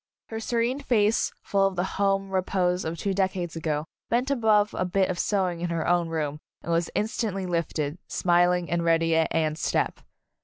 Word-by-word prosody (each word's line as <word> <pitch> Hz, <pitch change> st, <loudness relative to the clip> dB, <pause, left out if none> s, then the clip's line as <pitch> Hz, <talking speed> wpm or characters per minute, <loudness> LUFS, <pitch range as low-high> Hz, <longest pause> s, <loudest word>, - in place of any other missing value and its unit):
Her 225 Hz, -, -4 dB
serene 235 Hz, +3 st, 0 dB
face, 225 Hz, -5 st, +2 dB
full 195 Hz, -1 st, +2 dB
of 195 Hz, -, -4 dB
the 180 Hz, -, 0 dB
home 195 Hz, 0 st, 0 dB
repose 185 Hz, -1 st, 0 dB
of 160 Hz, +1 st, -3 dB
two 195 Hz, +5 st, -1 dB
decades 185 Hz, -3 st, -1 dB
ago, 155 Hz, -2 st, -2 dB, 0.2 s
bent 250 Hz, +4 st, +1 dB
above 215 Hz, -5 st, +3 dB
a -, -, -1 dB
bit 185 Hz, +1 st, +1 dB
of 175 Hz, -, -5 dB
sewing 185 Hz, -4 st, 0 dB
in 175 Hz, -, -1 dB
her 170 Hz, -1 st, -1 dB
own 175 Hz, -1 st, +2 dB
room 150 Hz, -2 st, -2 dB, 0.2 s
and 170 Hz, -, -3 dB
was 165 Hz, 0 st, +1 dB
instantly 210 Hz, -3 st, -1 dB
lifted, 165 Hz, -3 st, -2 dB
smiling 175 Hz, 0 st, +2 dB
and 170 Hz, +2 st, 0 dB
ready 165 Hz, 0 st, +3 dB
at 160 Hz, 0 st, +3 dB
Anne's 155 Hz, -1 st, 0 dB
step. -, -, 0 dB
180 Hz, 185 wpm, -26 LUFS, 165-200 Hz, 0.2 s, above